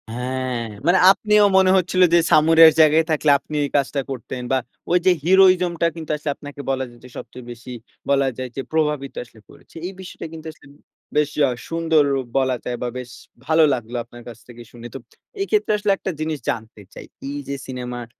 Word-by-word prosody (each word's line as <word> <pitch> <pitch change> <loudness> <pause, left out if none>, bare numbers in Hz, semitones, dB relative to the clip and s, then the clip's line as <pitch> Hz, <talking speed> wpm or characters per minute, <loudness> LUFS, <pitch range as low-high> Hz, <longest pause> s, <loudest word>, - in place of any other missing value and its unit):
হ্যাঁ, 125 -1 -3 0.2
মানে 180 +2 +5
আপনিও 210 +1 +3
মনে 190 -1 +5
হচ্ছিল 185 0 +1
যে 170 - +7
সামুরাইয়ের 160 +1 +7
জায়গায় 155 +1 +4
থাকলে 155 -1 +1
আপনি 155 - -9
এই - - -5
কাজটা 140 0 -1
করতেন 125 0 -6
বা, 130 - +3 0.3
ওইযে 180 +1 +4
heroism 185 -1 +5
টা 170 - +4
কিন্তু 160 -2 -6
আসলে 150 0 -5
আপনাকে 145 0 -10
বলা 130 0 0
যায় 120 0 -18
যে 125 - -12
সবচেয়ে 125 -1 -10
বেশি 125 +1 -10 0.4
বলা 140 -1 +3
যায় 130 -1 -5
যে 135 - -3
প্রভাবিত 150 -3 -1
আসলে 115 -2 -20
করেছে। - - -20
এই 195 - -8
বিষয়টা 185 -2 -9
কিন্তু 160 0 -10
আসলে 155 - -20 0.5
বেশ 150 -1 +2 0.2
আ - - 0 0.2
সুন্দর 165 -2 +2 0.3
বলা 130 -1 +1
যায় 120 -1 -3
বা, 125 - -2
বেশ 125 -1 -8 0.3
ভালো 160 +1 +4
লাগলো 120 -1 -5
আপনার 120 0 -14
কাছ 115 -2 -9
থেকে 120 -1 -12
শুনে। 120 0 -10
তো - - -3 0.4
এইক্ষেত্রে 410 - 0
আসলে 210 -1 0
একটা 190 - -4
জিনিস 155 -1 -3
জানতে 110 -2 -5
চাই? - - -10 0.2
এইযে 140 -1 -5
সিনেমার 125 -2 -6
145 Hz, 190 wpm, -21 LUFS, 125-165 Hz, 0.5 s, যে